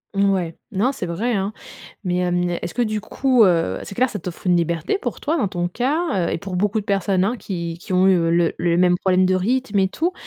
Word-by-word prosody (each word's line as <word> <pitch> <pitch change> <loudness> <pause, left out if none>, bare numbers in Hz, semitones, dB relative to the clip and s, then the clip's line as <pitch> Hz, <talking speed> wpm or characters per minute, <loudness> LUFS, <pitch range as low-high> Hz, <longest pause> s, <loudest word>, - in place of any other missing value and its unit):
Ouais, 190 -4 +1
non, 225 +8 +1
c'est 200 - -4
vrai, 215 +8 -1
hein, 195 0 -1 0.5
mais, 180 -2 -1
hem, 175 0 0
est-ce 170 - -6
que 245 - +1
du 215 -2 -1
coup, 250 +2 +3
heu, 165 - +2
c'est - - -8
clair, 255 +4 +2
ça 205 - -4
t'offre 180 +1 -8
une 175 - +4
liberté 170 - 0
pour - - -5
toi, 315 +3 0
dans 210 - +1
ton 175 -1 -2
cas, 255 - 0
heu, - - -2
et - - -1
pour 185 0 -5
beaucoup 210 +3 +1
de - - -10
personnes, 195 -2 +1
hein, 235 +5 0
qui 170 -5 -5
qui 185 +1 -8
ont 185 +1 +4
eu, 190 - +5
heu, 165 -1 +1
le 170 -1 +2
le 170 -1 +1
même 180 0 +4
problème 185 0 +2
de 185 - +2
rythme 220 +1 0
et 190 - +3
tout. 335 - -1
190 Hz, 250 wpm, -21 LUFS, 175-215 Hz, 0.5 s, eu